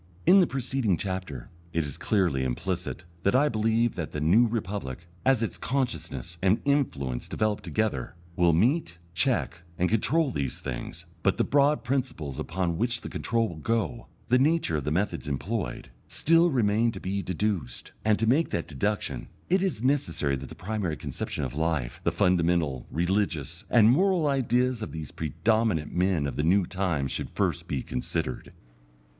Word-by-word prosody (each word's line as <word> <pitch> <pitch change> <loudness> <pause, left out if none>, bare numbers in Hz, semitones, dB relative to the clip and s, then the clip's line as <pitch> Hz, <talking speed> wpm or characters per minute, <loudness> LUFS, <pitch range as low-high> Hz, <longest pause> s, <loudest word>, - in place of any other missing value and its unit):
In 185 +3 +8
the 180 - +5
preceding 130 -7 0
chapter 95 -10 -5 0.2
it 85 - +1
is 70 - -6
clearly 90 -11 +1
implicit 90 +7 -3 0.2
that 100 +6 +2
I 145 +3 +4
believe 115 +1 +1
that 85 -3 -5
the 75 - -2
New 95 +11 +5
Republic, 95 - -4 0.2
as 130 -4 +3
its 115 - -3
consciousness 120 -9 -3
and 95 +3 +3
influence 75 - 0
develop 110 -1 0
together, 105 - -2 0.2
will 85 -1 +4
meet, 105 - +2 0.2
check, 85 - 0 0.2
and 90 - +2
control 140 +7 +2
these 70 - -2
things; - - -6 0.2
but - - +2
the - - +3
broad 145 +1 +3
principles 120 - -2
upon 85 +2 -2
which 120 0 0
the - - -6
control 115 -1 0
will 85 - -8
go, 115 +6 -1 0.2
the 125 +3 +4
nature 150 - +2
of 70 - -4
the 75 - 0
methods 95 0 -1
employed, 75 - -3 0.2
still 165 +2 +3
remain 115 -4 +2
to - - -6
be 100 +1 -2
deduced. 90 - -2
And 110 -1 +3
to 115 - +1
make 140 +9 +3
that 85 - -2
deduction, 85 - -2 0.2
it 185 +2 +3
is 185 - -1
necessary 85 - +1
that 65 0 -8
the - - -10
primary 95 -5 -3
conception - - -4
of 65 - -3
life, 80 -5 -1
the - - +2
fundamental, 85 -7 +1
religious, 85 -4 -1
and 115 -1 +6
moral 180 +3 +3
ideas 125 -3 +1
of 110 - -5
these 80 -2 -6
predominant 85 +1 0
men 90 -4 +1
of 70 -3 -4
the 75 - +1
new 90 +4 +4
time 85 -7 -1
should - - -4
first - - -1
be 65 - -2
considered. 65 0 -3
100 Hz, 170 wpm, -27 LUFS, 80-120 Hz, 0.2 s, In